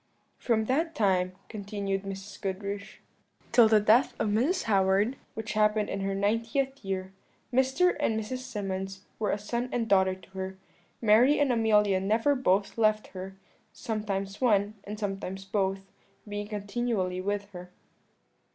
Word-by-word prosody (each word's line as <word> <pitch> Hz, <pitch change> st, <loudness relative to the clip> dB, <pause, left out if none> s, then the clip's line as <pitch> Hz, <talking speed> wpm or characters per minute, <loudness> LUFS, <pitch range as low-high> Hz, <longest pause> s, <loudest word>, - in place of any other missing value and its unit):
"From 220 Hz, -3 st, +1 dB
that 320 Hz, +7 st, 0 dB
time," 185 Hz, -5 st, +2 dB
continued 200 Hz, -2 st, -3 dB
Mrs. 195 Hz, +1 st, -8 dB
Goodriche, 200 Hz, 0 st, -5 dB, 0.5 s
"till 235 Hz, -1 st, +7 dB
the 215 Hz, -1 st, +5 dB
death 220 Hz, +5 st, +4 dB
of 215 Hz, -, 0 dB
Mrs. 260 Hz, -, +1 dB
Howard, 195 Hz, +3 st, +2 dB, 0.2 s
which 220 Hz, -1 st, -4 dB
happened 210 Hz, 0 st, +2 dB
in 195 Hz, -, -2 dB
her 195 Hz, 0 st, -1 dB
ninetieth 230 Hz, +6 st, 0 dB
year, 190 Hz, -1 st, -3 dB, 0.4 s
Mr. 265 Hz, +8 st, +3 dB
and 225 Hz, -7 st, +1 dB
Mrs. 220 Hz, +4 st, -4 dB
Symonds 195 Hz, -6 st, -4 dB, 0.2 s
were 210 Hz, -2 st, 0 dB
a -, -, +1 dB
son 235 Hz, +4 st, -3 dB
and 235 Hz, -2 st, -1 dB
daughter 190 Hz, -2 st, +3 dB
to 190 Hz, -, -18 dB
her. 190 Hz, 0 st, -5 dB, 0.5 s
Mary 230 Hz, +7 st, +5 dB
and 285 Hz, -3 st, +3 dB
Amelia 210 Hz, -4 st, +3 dB
never 220 Hz, +8 st, +2 dB
both 205 Hz, -5 st, +1 dB
left 215 Hz, -1 st, +2 dB
her; 190 Hz, 0 st, -8 dB, 0.4 s
sometimes 205 Hz, -3 st, -3 dB
one, 210 Hz, -4 st, +3 dB
and 210 Hz, +1 st, -6 dB
sometimes 195 Hz, -2 st, -4 dB
both, 195 Hz, -1 st, 0 dB, 0.5 s
being 205 Hz, 0 st, -4 dB
continually 205 Hz, -3 st, -2 dB
with 205 Hz, +1 st, -3 dB
her." 180 Hz, -1 st, -9 dB
205 Hz, 145 wpm, -28 LUFS, 195-230 Hz, 0.5 s, till